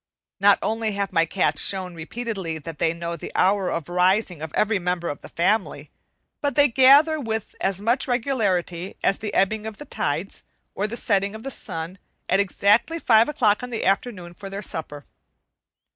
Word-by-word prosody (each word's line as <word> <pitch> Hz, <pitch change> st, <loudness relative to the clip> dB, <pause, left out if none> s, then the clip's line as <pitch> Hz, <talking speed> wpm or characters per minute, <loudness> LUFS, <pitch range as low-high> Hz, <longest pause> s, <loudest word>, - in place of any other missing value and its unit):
Not 200 Hz, +1 st, +6 dB
only 220 Hz, -1 st, -1 dB
have 200 Hz, -1 st, -3 dB
my 165 Hz, 0 st, +3 dB
cats 185 Hz, -, +1 dB
shown 185 Hz, -2 st, -1 dB
repeatedly 185 Hz, 0 st, -4 dB
that 160 Hz, 0 st, -9 dB
they 160 Hz, -, +2 dB
know 170 Hz, 0 st, -5 dB
the -, -, -8 dB
hour 195 Hz, -1 st, +2 dB
of 165 Hz, -3 st, -3 dB
rising 180 Hz, -1 st, +1 dB
of 160 Hz, -1 st, -6 dB
every 215 Hz, -1 st, +2 dB
member 180 Hz, -1 st, -2 dB
of 145 Hz, -, -6 dB
the -, -, -11 dB
family, 195 Hz, +4 st, -1 dB, 0.5 s
but 285 Hz, -3 st, -1 dB
they 290 Hz, -1 st, +5 dB
gather 280 Hz, +5 st, +6 dB
with 225 Hz, -5 st, -4 dB
as 195 Hz, 0 st, 0 dB
much 235 Hz, +6 st, +1 dB
regularity 200 Hz, -9 st, -1 dB
as 195 Hz, -, +2 dB
the 210 Hz, -1 st, -4 dB
ebbing 215 Hz, +3 st, +1 dB
of 215 Hz, -2 st, -7 dB
the 295 Hz, -, -9 dB
tides, 165 Hz, -, -3 dB, 0.3 s
or 205 Hz, -, -1 dB
the 235 Hz, +2 st, -4 dB
setting 200 Hz, -2 st, 0 dB
of 220 Hz, -, -9 dB
the 270 Hz, -, -4 dB
sun, 165 Hz, -3 st, -3 dB, 0.3 s
at 190 Hz, -, +2 dB
exactly 200 Hz, -, +2 dB
five 230 Hz, -6 st, +4 dB
o'clock 220 Hz, -8 st, +2 dB
in 250 Hz, -, -6 dB
the 235 Hz, -, -3 dB
afternoon 195 Hz, -3 st, -1 dB
for 195 Hz, +3 st, -9 dB
their 200 Hz, +2 st, -6 dB
supper. 150 Hz, -5 st, -7 dB
200 Hz, 185 wpm, -23 LUFS, 175-225 Hz, 0.5 s, Not